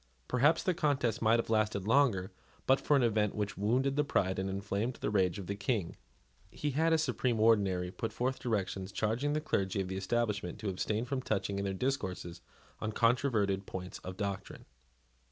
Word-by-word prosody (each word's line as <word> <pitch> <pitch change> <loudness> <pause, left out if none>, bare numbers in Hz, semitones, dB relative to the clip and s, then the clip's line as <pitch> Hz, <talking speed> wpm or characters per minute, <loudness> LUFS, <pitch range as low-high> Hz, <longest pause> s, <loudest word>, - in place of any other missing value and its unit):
Perhaps 145 +6 +3
the 185 - +2
contest 140 -8 0
might 115 +1 +4
have 115 - -2
lasted 110 -3 +1
longer, 110 -6 +3 0.3
but 135 +1 +4
for 145 - +3
an 135 - +4
event 105 -3 +1
which 105 -2 -2
wounded 125 +7 +1
the 150 - +3
pride 95 -9 0
and 95 +1 -2
inflamed 100 +5 -2
the - - -3
rage 95 -4 +2
of 100 - -6
the 100 - -3
King. 100 -3 -1 0.5
He 150 - -3
had, 160 +4 +2
as 160 -1 +3
supreme 125 -4 0
ordinary, 100 -5 +3
put 115 - -4
forth 130 +2 -1
directions, 100 -5 -2
charging 115 +9 0
the 155 - +1
clergy 100 -9 0
of 95 -1 -2
the 95 - -3
establishment 105 -2 -1
to 105 - -3
abstain 105 +4 -1
from 130 +1 -2
touching 100 -4 -1
in 100 - -2
their 95 - -1
discourses 95 -9 -3 0.4
on 110 0 -3
controverted 110 -6 +2
points 90 0 -6
of 95 0 -8
doctrine. 100 -2 -4
110 Hz, 190 wpm, -32 LUFS, 95-125 Hz, 0.5 s, might